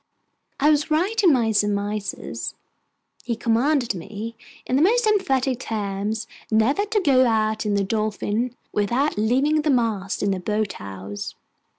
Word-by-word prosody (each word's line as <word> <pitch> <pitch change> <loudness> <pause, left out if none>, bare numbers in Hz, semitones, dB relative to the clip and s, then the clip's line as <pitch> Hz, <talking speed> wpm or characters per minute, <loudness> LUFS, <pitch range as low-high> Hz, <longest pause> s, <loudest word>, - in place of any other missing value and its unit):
I 295 +2 +5
was 300 +1 +1
right 375 +9 +1
in 355 - +7
my 235 -5 +2
surmises. 205 - -2 0.7
He 235 0 -2
commanded 240 +3 +1
me, 210 +6 -7 0.3
in 255 - 0
the 275 - +3
most 465 +7 +4
emphatic 270 - +1
terms, 210 -1 -3 0.2
never 230 - +2
to 420 0 +1
go 260 -6 +4
out 220 -1 +1
in 205 - +1
the 200 - +2
Dolphin 215 +3 -1 0.2
without 240 +8 +1
leaving 270 +8 +2
the 300 - -1
mast 225 -7 0
in 200 - +2
the 190 - -1
boat 210 +2 -1
house. 100 +1 -7
225 Hz, 150 wpm, -23 LUFS, 205-280 Hz, 0.7 s, in